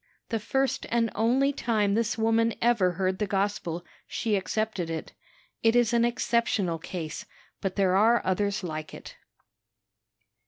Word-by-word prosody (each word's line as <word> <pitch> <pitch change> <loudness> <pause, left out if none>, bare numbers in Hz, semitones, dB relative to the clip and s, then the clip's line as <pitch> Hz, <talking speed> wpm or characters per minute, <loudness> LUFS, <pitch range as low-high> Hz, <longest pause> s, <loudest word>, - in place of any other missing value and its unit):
The 225 - -1
first 270 +5 -1
and 230 -1 +1
only 255 +6 +2
time 215 -6 +1
this 230 +1 0
woman 225 +1 +2
ever 225 -7 +3
heard 185 +1 -1
the 210 - 0
gospel, 190 -4 -2 0.2
she 220 -2 -1
accepted 195 -2 -2
it. 160 -1 -5 0.5
It 225 +1 +3
is 240 -1 +3
an 235 0 +4
exceptional 235 -7 0
case, 165 -2 -6 0.3
but 190 -1 -2
there 190 -2 +2
are 225 +4 +4
others 200 +1 0
like 155 -3 -5
it." - - -11
210 Hz, 145 wpm, -27 LUFS, 185-230 Hz, 0.5 s, an